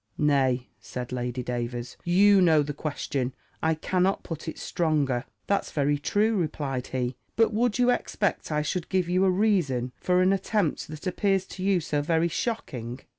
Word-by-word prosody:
"Nay," 135 -4 +2
said 125 -1 -6
Lady 125 0 -3
Davers, 120 0 -4
"you 195 +3 +5
know 160 -4 +5
the 145 +1 -4
question; 140 -3 -3 0.3
I 160 0 +2
cannot 185 +4 0
put 165 -1 -6
it 160 - -5
stronger." 145 -7 0 0.2
"That's 200 - 0
very 145 0 +1
true," 215 +8 +1
replied 145 -6 -2
he: 125 -1 -2 0.2
"But 225 -1 +3
would 230 +1 +1
you 250 0 +4
expect 205 -7 -1
I 150 0 +1
should 170 +3 -3
give 185 -2 +1
you 180 +2 +2
a - - +4
reason 180 - +1
for 180 0 +3
an 190 +1 +4
attempt 195 -3 0
that 155 +3 -9
appears 190 +1 +1
to 185 - -7
you 195 -2 +3
so 150 -1 -1
very 165 +3 +1
shocking?" 130 - -3
160 Hz, 175 wpm, -27 LUFS, 130-190 Hz, 0.3 s, you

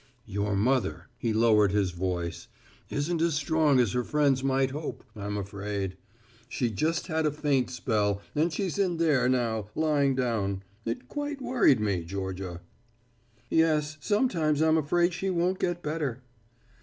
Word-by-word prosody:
"Your 105 -1 -1
mother," 125 +6 0
he 115 - 0
lowered 110 -3 +4
his 100 -2 +1
voice, 85 -1 -3 0.4
"isn't 160 +3 -1
as 165 -2 +2
strong 145 -1 +3
as 120 -5 +3
her 125 0 0
friends 140 -2 +2
might 135 0 +2
hope, 150 +2 -5
I'm 105 0 -4
afraid. 100 -1 -4 0.5
She 120 -3 -1
just 155 +9 0
had 160 -3 0
a - - +1
faint 140 -4 +1
spell, 105 -5 0
and 160 +3 +1
she's 185 +3 -2
in 180 -4 +1
there 145 -7 +3
now, 115 -5 0
lying 145 -4 +2
down. 105 -6 -1 0.2
It 115 0 -4
quite 290 -1 -4
worried 245 - +3
me, 100 -5 0
Georgia." 95 0 -5 0.9
"Yes, 155 0 +2
sometimes 170 - +1
I'm 160 0 +4
afraid 175 +4 +2
she 190 +3 -2
won't 180 +1 0
get 175 -1 -1
better." 150 -5 -3
135 Hz, 150 wpm, -28 LUFS, 105-160 Hz, 0.9 s, lowered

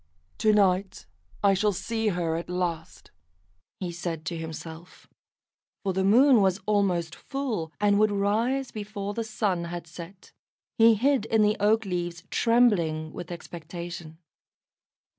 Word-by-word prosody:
"To 215 - +4
night 195 - +1 0.4
I 200 -1 +5
shall 205 +2 +1
see 225 +4 -2
her 175 -4 0
at 170 +1 -5
last," 175 -3 -4 0.7
he 180 -2 -3
said 170 -2 -5
to 170 - -3
himself, 160 +1 -8 0.8
for 195 -2 0
the 190 +1 0
Moon 240 +4 +6
was 190 0 +2
almost 190 -6 +1
full, 245 - -4
and 205 0 +3
would 215 0 +4
rise 225 +7 0
before 205 -1 -5
the 230 - -2
Sun 210 -6 -1
had 170 0 -6
set. 170 +3 -11 0.5
He 225 0 +7
hid 260 +1 +2
in 220 -1 +3
the 210 0 +3
oak 220 +2 +3
leaves, 175 -2 -3
trembling 180 -10 +2
with 175 - -7
expectation. 170 -1 -8
195 Hz, 140 wpm, -26 LUFS, 170-215 Hz, 0.8 s, He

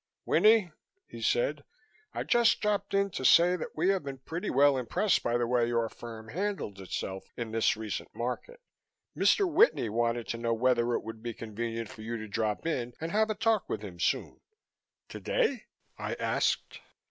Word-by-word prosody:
"Winnie," 215 -5 +4 0.3
he - - -10
said, - - +1 0.5
"I - - -3
just 235 -1 +3
dropped 205 -1 -1
in 200 0 +2
to 130 - -5
say 175 +6 +6
that 175 - -6
we 175 +4 +2
have 195 -1 +2
been 140 -1 -6
pretty 165 +6 -5
well 140 +1 +5
impressed 130 - +1
by 120 0 0
the 120 - 0
way 120 0 +2
your 115 -1 +1
firm 110 -1 -10
handled 180 - -3
itself 95 0 -5
in 115 -2 -4
this 110 -1 +2
recent 110 -3 -5
market. 125 - -4 0.6
Mr. 400 - +3
Whitney 345 - +4
wanted 115 +1 0
to 115 - -3
know 115 0 0
whether 120 0 +2
it - - -2
would 110 0 -8
be 120 -1 -5
convenient 115 +1 -4
for 110 - -11
you 115 +2 -4
to 110 -1 -7
drop 105 +3 -2
in 125 -7 -2
and 165 +1 -4
have 220 +1 +2
a 215 - -1
talk 220 -1 +1
with - - -3
him 90 -4 -9
soon." - - -1 0.7
"Today?" - - -1 0.3
I - - -3
asked. - - -1
120 Hz, 180 wpm, -30 LUFS, -, 0.7 s, say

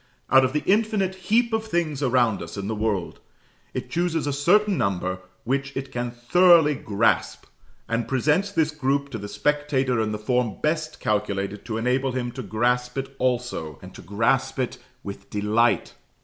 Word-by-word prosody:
Out 135 0 +7
of 130 0 0
the 150 - 0
infinite 205 -2 +2
heap 225 +5 +1
of 220 0 0
things 165 -7 -1
around 120 -5 +2
us - - -8
in 100 0 -4
the 110 - -1
world, 105 -4 -2 0.5
it - - -5
chooses 170 -2 0
a 145 - -1
certain 195 +8 +3
number 95 - -1 0.2
which 140 +3 -2
it 135 0 -5
can 120 -1 -2
thoroughly 155 +6 +5
grasp, 110 -4 0 0.4
and 115 +1 -1
presents 150 +9 +1
this 160 -5 +1
group 140 -1 -1
to 115 - -4
the 105 - -6
spectator 135 -2 0
in 110 -1 -1
the 105 - -2
form 115 0 0
best 155 0 -1
calculated 100 -1 -2
to 110 -2 -3
enable 125 +3 0
him 125 -1 -2
to 130 - -6
grasp 125 +4 0
it 135 0 -4
also, 120 - -1
and - - -11
to - - -11
grasp 120 +7 0
it 130 -2 -2 0.2
with 100 0 -8
delight. 105 - +1
130 Hz, 175 wpm, -24 LUFS, 110-150 Hz, 0.5 s, Out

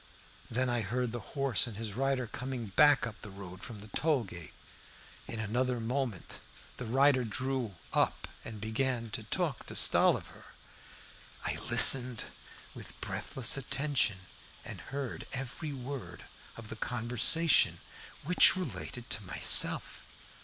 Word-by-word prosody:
Then 130 +3 0
I 120 -1 0
heard 120 +4 -2
the 120 - -4 0.2
horse 135 -7 +2
and 110 -4 -8
his 110 -2 -5
rider 135 +1 0
coming 125 +1 -5
back 145 +7 +5
up 110 -2 -8
the 105 - -8
road 95 -1 -10
from 105 0 -9
the 105 - -11
tollgate. 115 - -2 0.8
In 115 - -5
another 120 +3 -1
moment 120 -4 -4 0.4
the 125 - -6
rider 130 +2 +3
drew 120 -1 -3 0.2
up - - 0 0.2
and 110 -1 -8
began 115 +1 -2
to - - -5
talk - - -3
to - - -6
Stolliver. - - +2 0.9
I - - -1
listened 125 -3 +5 0.5
with - - -12
breathless 135 -4 -1
attention, 135 -6 0 0.4
and - - -7
heard 135 -2 -6
every 135 +4 -5
word 135 -1 -7 0.3
of 115 -2 -10
the - - -6
conversation, 125 +7 +3 0.4
which 180 +5 +6
related 120 - -6
to 110 - -2
myself. 95 - +4
125 Hz, 130 wpm, -31 LUFS, 110-135 Hz, 0.9 s, which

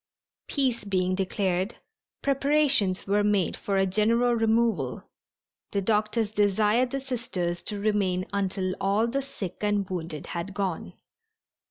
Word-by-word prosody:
Peace 260 -5 0
being 185 -2 0
declared, 190 +1 -1 0.5
preparations 275 -8 +2
were 205 +1 +2
made 205 -4 +2
for 200 -1 -2
a 195 - +3
general 230 +5 +2
removal. 225 0 +1 0.7
The 200 -1 0
doctors 215 +1 +1
desired 210 +4 +2
the 275 - -2
Sisters 190 -10 -3
to 205 -1 -4
remain 200 -3 +1
until 190 -1 0
all 200 +3 +2
the 260 +4 -1
sick 210 -10 -6
and 205 -2 +1
wounded 165 -5 -5
had 175 +3 -4
gone. 190 -5 -3
205 Hz, 130 wpm, -27 LUFS, 190-230 Hz, 0.7 s, a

